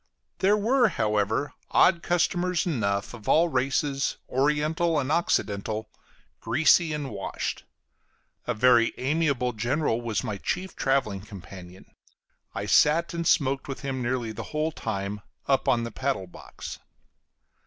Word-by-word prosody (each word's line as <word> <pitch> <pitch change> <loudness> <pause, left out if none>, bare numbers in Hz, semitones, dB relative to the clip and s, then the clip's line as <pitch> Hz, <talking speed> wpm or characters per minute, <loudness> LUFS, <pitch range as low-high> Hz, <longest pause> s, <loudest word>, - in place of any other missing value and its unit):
There 205 +2 +4
were, 240 +4 +3
however, 105 - 0 0.2
odd 170 -2 +4
customers 175 +1 +1
enough, 100 - -1
of 110 -4 -8
all 170 +2 +4
races, 135 +1 0
oriental 150 +5 +1
and 135 0 -2
occidental, 110 -9 0 0.5
greasy 160 +1 +3
and 150 -4 -3
washed. 100 -2 -4 0.8
A - - 0
very 120 0 +4
amiable 140 -3 0
general 120 +2 0
was 115 -3 -2
my 105 - -3
chief 185 - -3
traveling 135 -8 0
companion; 95 -3 -11 0.7
I - - -3
sat 165 +4 +3
and 170 -1 -2
smoked 135 -1 +2
with 135 - -6
him 135 -2 -3
nearly 120 -2 -1
the 110 +1 -6
whole 155 +1 -1
time, 105 -6 -4 0.2
up 135 -1 +1
on 120 -1 +2
the 115 - -5
paddle 130 -6 -2
box. 90 - -10
135 Hz, 135 wpm, -26 LUFS, 110-160 Hz, 0.8 s, There